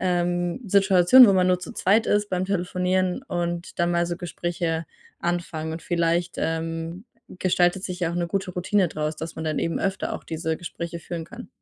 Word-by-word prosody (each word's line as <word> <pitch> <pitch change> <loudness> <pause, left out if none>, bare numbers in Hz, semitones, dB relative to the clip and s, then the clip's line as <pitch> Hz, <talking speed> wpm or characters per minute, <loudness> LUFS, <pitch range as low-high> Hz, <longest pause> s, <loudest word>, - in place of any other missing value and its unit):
ähm, 175 +1 0
Situation, 195 +5 +7
wo 200 - +5
man 185 -1 +3
nur 180 0 +3
zu 180 - -7
zweit 210 +4 +2
ist 205 0 +1
beim 185 0 0
Telefonieren, 185 +1 0
und 175 -4 -3
dann 175 0 +2
mal 170 0 +1
so 175 - -3
Gespräche 170 -1 -3 0.3
anfangen. 170 -2 -2
Und 160 0 -6
vielleicht, 170 0 0
ähm, 165 +3 -3 0.3
gestaltet 185 0 +1
sich 180 0 -5
ja 170 -2 0
auch - - -4
'ne 175 0 0
gute 190 0 -2
Routine 185 +1 +1
draus, 155 0 -3
dass 160 +1 -6
man 160 - -4
dann 155 -1 -1
eben 165 - -1
öfter 195 -1 -2
auch - - -7
diese 160 0 -2
Gespräche 170 0 -6
führen 165 -1 -5
kann. 235 +6 -10
175 Hz, 190 wpm, -24 LUFS, 165-185 Hz, 0.3 s, Situation